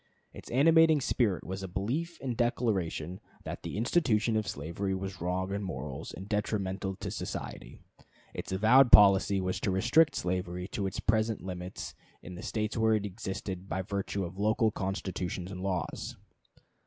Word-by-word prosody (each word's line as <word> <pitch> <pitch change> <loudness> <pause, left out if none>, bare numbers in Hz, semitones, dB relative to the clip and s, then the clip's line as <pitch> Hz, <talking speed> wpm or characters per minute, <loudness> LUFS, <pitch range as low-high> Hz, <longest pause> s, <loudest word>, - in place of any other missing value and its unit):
Its - - -11
animating 160 +4 +5
spirit 115 -7 +1
was 95 +1 -5
a 95 - -4
belief 125 - -3
and 125 -3 -2
declaration 95 -8 -1 0.2
that - - -6
the - - -5
institution 115 -3 +2
of 110 -2 0
slavery 95 +3 -3
was 95 -2 -5
wrong 95 +2 -1
in 100 - -2
morals 95 -2 -5
and 95 +4 -8
detrimental 100 -2 -1
to - - -5
society; - - -6 0.6
its - - -6
avowed 115 +6 +5
policy 100 -1 +7
was 95 0 -1
to - - -1
restrict 125 +11 +4
slavery 90 0 -2
to 100 -1 -2
its 95 - -4
present 110 0 +1
limits 90 -1 -6 0.3
in 90 - -8
the 90 - -8
States 110 -1 -2
where 110 -1 +3
it 105 -1 -1
existed 95 -2 -5
by 95 - -1
virtue 100 0 -2
of 90 +3 -8
local 110 +2 +3
constitutions 95 -2 -3
and 90 -1 -6
laws. 95 -3 -3
100 Hz, 160 wpm, -30 LUFS, 95-110 Hz, 0.6 s, policy